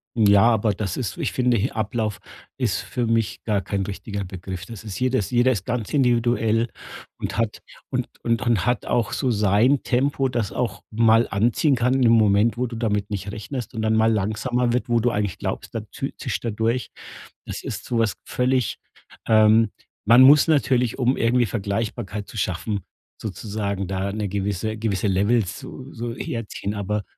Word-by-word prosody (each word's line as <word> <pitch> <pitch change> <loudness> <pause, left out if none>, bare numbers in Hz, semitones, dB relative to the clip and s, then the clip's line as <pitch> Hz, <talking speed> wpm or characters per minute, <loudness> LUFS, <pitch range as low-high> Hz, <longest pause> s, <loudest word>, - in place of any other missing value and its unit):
Ja, 100 -3 +5
aber 110 -2 +3
das 100 -1 -3
ist: 115 -9 -3
ich - - -1
finde, 125 -1 +2
he 115 +4 0
Ablauf 110 -1 -2 0.4
ist - - 0
für 120 -2 -3
mich 115 -2 0
gar 105 -3 +1
kein 100 +2 -2
richtiger 100 0 -5
Begriff. 95 0 -7
Das 115 -3 -9
ist 105 -4 -6
jedes 130 -4 0
jeder 125 +1 +4
ist 95 - -4
ganz 115 -3 -3
individuell 120 -3 +2 0.5
und - - -4
hat 115 -2 -1 0.3
und - - -1
und 115 -1 0
und 120 -4 +1
hat 125 0 0
auch 120 -3 0
so 130 -3 0
sein 105 +6 +3
Tempo, 135 +1 +1
das 120 -5 -2
auch 125 -2 -2
mal 115 +1 +4
anziehen 120 +8 +2
kann 125 +1 +1
in 135 - +1
dem 120 -2 +5
Moment, 110 0 +4
wo 125 0 0
du 115 - -7
damit 105 -3 -1
nicht 100 0 -4
rechnest 120 +4 -6
und 110 - -3
dann 110 0 +2
mal 110 +1 +4
langsamer 120 +4 0
wird, 125 +1 -1
wo 120 -1 +3
du 120 +2 +1
eigentlich 105 -4 -2
glaubst, - - -5
dann - - -4
tü - - -4
zischt - - -3
er 115 - -1
durch. 115 +3 -1 0.6
Das - - -6
ist - - -5
so 120 - -1
was 110 -5 +1
völlig, 125 -1 0 0.5
ähm 110 0 +5 0.3
man 115 +4 +7
muss 145 +4 +8
natürlich, 130 -6 +2
um 130 +1 +2
irgendwie 120 +1 +2
Vergleichbarkeit 105 0 -3
zu - - -13
schaffen, 100 +1 -2 0.4
sozusagen 100 -2 -3
da 95 +1 -2
'ne 105 -1 -2
gewisse 100 +2 -2
gewisse 105 -2 -1
Levels 100 +2 +1
so 135 0 -10
so 120 0 -4
herziehen, 105 -3 -4
aber 105 +1 -2
110 Hz, 185 wpm, -23 LUFS, 100-120 Hz, 0.6 s, muss